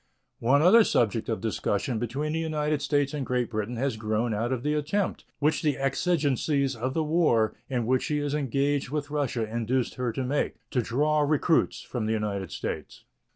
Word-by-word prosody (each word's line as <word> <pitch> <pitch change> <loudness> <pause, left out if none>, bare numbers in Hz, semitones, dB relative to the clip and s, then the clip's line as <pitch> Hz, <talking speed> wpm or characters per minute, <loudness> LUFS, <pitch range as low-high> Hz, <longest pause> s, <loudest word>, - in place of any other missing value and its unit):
One 140 +6 +3
other 225 +6 +8
subject 115 - +1
of 110 - -1
discussion 110 +1 -1
between 135 +7 -2
the 160 - 0
United 150 -2 -1
States 145 -1 +1
and 145 -2 -2
Great 125 -2 -1
Britain 110 +2 -2
has 130 -1 -1
grown 110 +1 -1
out 115 +4 -1
of 125 -2 -2
the 150 - +1
attempt, 155 +7 -1
which 150 +1 +1
the 150 -4 +1
exigencies 140 -2 +1
of 130 +3 -3
the 160 - +1
war 150 -9 +2 0.2
in 125 -4 -1
which 130 +2 +2
she 150 - 0
is 145 -1 -1
engaged 140 -1 0
with 145 0 -3
Russia 130 -6 -1
induced 120 +3 -1
her 125 -2 0
to 130 - -2
make, 140 +3 -1 0.2
to 125 - +2
draw 150 +7 +1
recruits 150 +2 +2
from 115 -4 -3
the 110 - +1
United 100 -4 -2
States. - - -5
135 Hz, 190 wpm, -27 LUFS, 115-150 Hz, 0.2 s, other